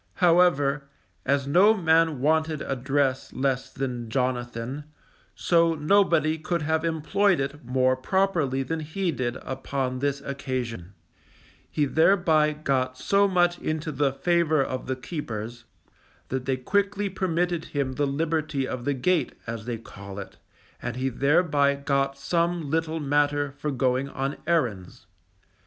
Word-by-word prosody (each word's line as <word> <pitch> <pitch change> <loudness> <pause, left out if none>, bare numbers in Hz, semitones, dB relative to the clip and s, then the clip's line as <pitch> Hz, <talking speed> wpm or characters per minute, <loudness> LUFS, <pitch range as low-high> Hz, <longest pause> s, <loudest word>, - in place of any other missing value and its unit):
However, 150 -6 +3 0.4
as 140 0 +2
no 185 +10 +5
man 160 - +2
wanted 155 +1 +1
address 135 0 -1
less 135 -1 -1
than 125 -4 -4
Jonathan, 125 +2 -2 0.5
so 165 -1 +3
nobody 160 -1 +3
could 170 0 -2
have 160 +2 0
employed 170 +4 +1
it 140 +2 -4
more 130 +1 +2
properly 150 -2 0
than 160 +5 -3
he 170 +4 -2
did 125 -3 -2
upon 130 -1 -3
this 140 0 -1
occasion; 125 - -5 0.7
he 150 - +1
thereby 160 0 +3
got 135 -4 -1
so 200 +8 +3
much 175 -2 +2
into 155 0 -3
the 140 -1 +1
favour 160 0 +2
of 130 -1 -5
the 130 - -1
keepers, 120 -5 -6 0.6
that 130 -1 -3
they 135 0 0
quickly 200 +8 0
permitted 175 -3 -1
him 140 -2 -2
the 145 +2 0
liberty 155 -1 -1
of 125 -2 -5
the 145 -1 +1
gate, 170 +7 +1
as 115 -1 -5
they 120 -1 -3
call 100 -3 -10
it, 100 - -8 0.4
and - - -4
he 130 +1 -1
thereby 140 +1 +2
got 140 -1 0
some 170 +1 -1
little 160 0 0
matter 145 0 +1
for 150 +2 -4
going 130 0 0
on 135 +1 -3
errands. 120 - -1
145 Hz, 140 wpm, -26 LUFS, 130-165 Hz, 0.7 s, no